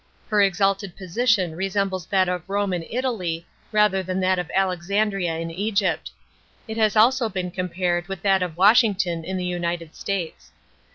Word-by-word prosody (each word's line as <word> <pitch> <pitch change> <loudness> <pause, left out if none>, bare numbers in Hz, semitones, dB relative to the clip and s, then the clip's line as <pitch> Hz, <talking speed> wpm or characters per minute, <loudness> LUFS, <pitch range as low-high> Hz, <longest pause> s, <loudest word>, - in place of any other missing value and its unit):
Her 210 -2 +3
exalted 195 0 +1
position 190 -2 +1
resembles 190 -1 -1
that 190 -2 +2
of 180 0 -3
Rome 200 -1 0
in 175 - -1
Italy 190 -10 -2 0.3
rather 210 -3 +3
than 185 0 -3
that 185 0 +2
of 175 - -4
Alexandria 190 -1 0
in 165 0 -4
Egypt; 200 +4 -1 0.6
it 220 0 -5
has 215 -2 +2
also 235 +2 +4
been 185 -2 -3
compared 175 -1 -1
to 195 - -3
that 195 0 +2
of 175 -3 -3
Washington 195 -4 +4
in 190 +3 -3
the 180 - -3
United 175 -2 -3
States. 165 - -4
190 Hz, 160 wpm, -23 LUFS, 175-205 Hz, 0.6 s, also